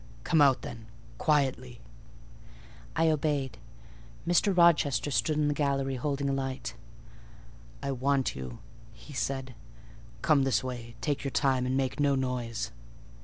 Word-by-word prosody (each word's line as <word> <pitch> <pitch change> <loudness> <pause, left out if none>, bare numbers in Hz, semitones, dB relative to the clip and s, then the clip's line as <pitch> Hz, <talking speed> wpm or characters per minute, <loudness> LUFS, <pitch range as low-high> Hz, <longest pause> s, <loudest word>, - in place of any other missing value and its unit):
"Come 160 -3 +3
out, 135 -4 +5
then, 115 -2 -8 0.3
quietly." 130 -5 +1 1.2
I 160 0 +4
obeyed. 145 -4 -1 0.7
Mr. 180 +2 +3
Rochester 150 -5 +4
stood 155 +2 +1
in 150 -1 +2
the 145 - +2
gallery 140 -2 0
holding 140 +2 -1
a 140 - +1
light. 135 -3 -3 1.1
"I 140 - -1
want 135 +1 +1
you," 65 -2 -6 0.4
he 150 - -13
said: 130 -1 -2 0.7
"come 150 -3 +4
this 135 -1 +2
way: 120 -2 -6
take 145 -3 -1
your 140 - -1
time, 130 -2 +1
and 130 +1 0
make 135 0 -1
no 145 -1 +3
noise." 125 -3 -2
135 Hz, 135 wpm, -29 LUFS, 130-145 Hz, 1.2 s, out